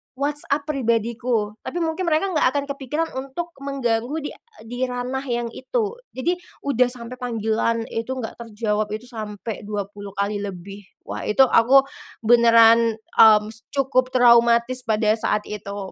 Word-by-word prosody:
WhatsApp 285 +1 -1
pribadiku, 230 -4 -1
tapi 345 - -3
mungkin 325 +3 -2
mereka 325 +4 +1
enggak 305 - +3
akan 285 - 0
kepikiran 290 +4 -3
untuk 275 +6 -6
mengganggu 265 -1 -2
di - - -4 0.3
di 245 +3 -3
ranah 250 +2 -4
yang 240 -1 -2
itu. 435 - -3 0.2
Jadi, 345 +7 0 0.3
udah 255 -3 +2
sampai 245 0 -5
panggilan 230 -1 -1
itu 230 +3 -3
enggak 240 -4 -6
terjawab, 215 -2 -2
itu 245 +3 -10
sampai 215 -2 -7
20 205 -1 -6
kali 200 +1 -1
lebih. 200 0 -8 0.2
Wah! - - -6
Itu 240 +6 +5
aku 265 +4 +5 0.4
benaran, 230 -1 +6
mmm, 215 -1 +4
s 225 -1 -6
cukup 265 -2 +2
traumatis 235 0 +4
pada 215 -1 +1
saat 210 -1 0
itu. 200 -2 -6
235 Hz, 145 wpm, -22 LUFS, 215-265 Hz, 0.4 s, benaran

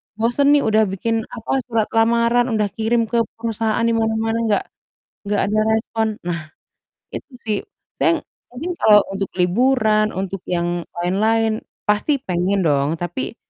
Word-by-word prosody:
bosen 235 +6 +1
nih 290 - +3
udah 220 0 +3
bikin, 225 +4 -2
apa, 230 +4 -1
surat 225 -3 0
lamaran 235 +2 +3
udah 210 -1 +1
kirim 230 +1 +1
ke 235 - +2 0.2
perusahaan 225 0 -1
di 230 - +2
mana-mana 225 0 0
nggak 210 -2 +1 0.6
nggak 205 0 0
ada 215 +1 +1
respon." 220 0 0 0.2
Nah, 165 -3 -4 0.6
itu - - -7 0.2
sih. 210 -2 0 0.4
Saya, - - +2 0.3
mungkin 320 +9 -5
kalau 210 -10 +6
untuk 195 -1 -3
liburan, 215 +2 +2
untuk 195 -1 -4
yang 175 0 -1 0.2
lain-lain, 220 +5 +1 0.2
pasti 210 +8 +2
pengen 180 +2 0
dong, 145 +2 +1
tapi 175 +8 -4
220 Hz, 140 wpm, -20 LUFS, 195-230 Hz, 0.6 s, kalau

